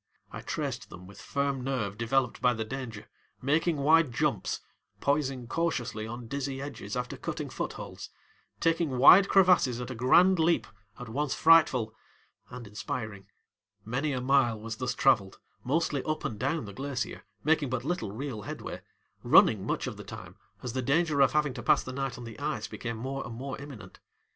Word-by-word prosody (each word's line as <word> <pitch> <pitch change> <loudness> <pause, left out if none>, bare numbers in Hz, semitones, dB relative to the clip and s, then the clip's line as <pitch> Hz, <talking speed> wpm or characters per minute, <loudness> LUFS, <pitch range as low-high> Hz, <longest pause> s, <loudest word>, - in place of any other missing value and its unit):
I - - -7
traced - - -4
them 90 +1 -11
with 100 +2 -13
firm 140 -2 -1
nerve 125 -7 -2
developed 120 +3 0
by 125 -2 +3
the 110 0 -3
danger, 115 -3 -6 0.3
making 155 +4 +1
wide 155 0 +4
jumps, 120 - -1 0.4
poising 135 -3 0
cautiously 120 -7 -2
on 120 +1 -7
dizzy 140 +1 -3
edges 135 -7 -6
after 125 0 -3
cutting - - -5
footholds, - - -6 0.5
taking 165 -5 +1
wide 185 +10 +8
crevasses 180 -11 +4
at 125 +1 -5
a - - -3
grand 170 +10 +5
leap 165 +1 +3 0.3
at 125 - -7
once 140 +5 -1
frightful 140 -9 +5 0.6
and 125 -1 -8
inspiring. 105 -1 -5 0.6
Many 135 +7 -1
a 130 -2 -2
mile 125 -4 +3
was 110 +1 -6
thus 125 0 -2
traveled, 110 -8 +3 0.3
mostly 145 0 0
up 155 0 -2
and 105 - -3
down 140 +2 -1
the 100 - -9
glacier, 135 +2 -4 0.2
making 155 -2 +2
but 130 0 -3
little 145 - -2
real 120 0 -5
headway, - - -7 0.4
running - - +5
much - - -1
of - - -5
the - - -8
time - - -10 0.3
as 125 -2 -4
the 130 - -1
danger 150 +2 +2
of 135 - +5
having 150 -3 +2
to 120 - -6
pass - - +3
the 130 - -7
night 135 -1 -3
on 125 - -8
the 115 -2 -9
ice - - -2
became 115 -1 -5
more 135 +4 -4
and 120 - -7
more 135 +3 -5
imminent. 120 -10 -11
130 Hz, 175 wpm, -29 LUFS, 115-145 Hz, 0.6 s, wide